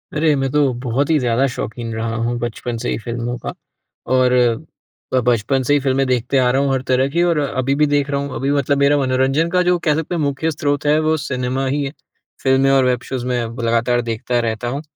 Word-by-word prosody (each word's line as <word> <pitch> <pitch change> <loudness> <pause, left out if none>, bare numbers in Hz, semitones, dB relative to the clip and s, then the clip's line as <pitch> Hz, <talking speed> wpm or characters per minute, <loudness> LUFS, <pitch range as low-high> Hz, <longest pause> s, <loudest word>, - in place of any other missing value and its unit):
अरे! 155 0 +3
मैं 135 -1 -1
तो 145 -3 +2
बहुत 130 +4 0
ही 160 - +4
ज़्यादा 125 +1 +1
शौक़ीन 115 0 -5
रहा 115 0 -3
हूँ 120 +1 -1
बचपन 120 0 -4
से 120 - -3
ही - - -1
फ़िल्मों 120 +1 -4
का। - - -6 0.5
और, 130 -1 +3 0.8
ब 130 - +4
बचपन 125 +3 +1
से 145 - +2
ही 145 - +4
फ़िल्में 135 0 +1
देखते 125 +1 0
आ 125 -1 +3
रहा 135 +2 +2
हूँ 140 -1 +1
हर 130 - 0
तरह 130 +1 +2
की, 170 +4 +1
और 170 -2 +2
अभी 135 -1 -1
भी 150 +1 +3
देख 145 -1 +1
रहा 140 0 0
हूँ। 140 -1 -5
अभी 135 +2 -1
मतलब 140 0 +1
मेरा 140 +1 +3
मनोरंजन 135 +4 +1
का 180 +1 +2
जो 180 0 +2
कह 155 -3 +1
सकते 160 +3 -3
हैं 165 - -1
मुख्य 145 +3 -1
स्रोत 145 -1 -2
है, 150 +1 +4
वो 155 0 +2
सिनेमा 130 -2 -2
ही, 140 +1 -1 0.5
फ़िल्में 135 0 +3
और 135 -1 +4
वेब 125 -1 +1
शोज़ 130 -2 -4
मैं 125 -1 0 0.2
लगातार 115 +1 +1
देखता 120 +1 -2
रहता 115 0 -2
हूँ। 135 +4 -3
135 Hz, 230 wpm, -19 LUFS, 120-145 Hz, 0.8 s, ही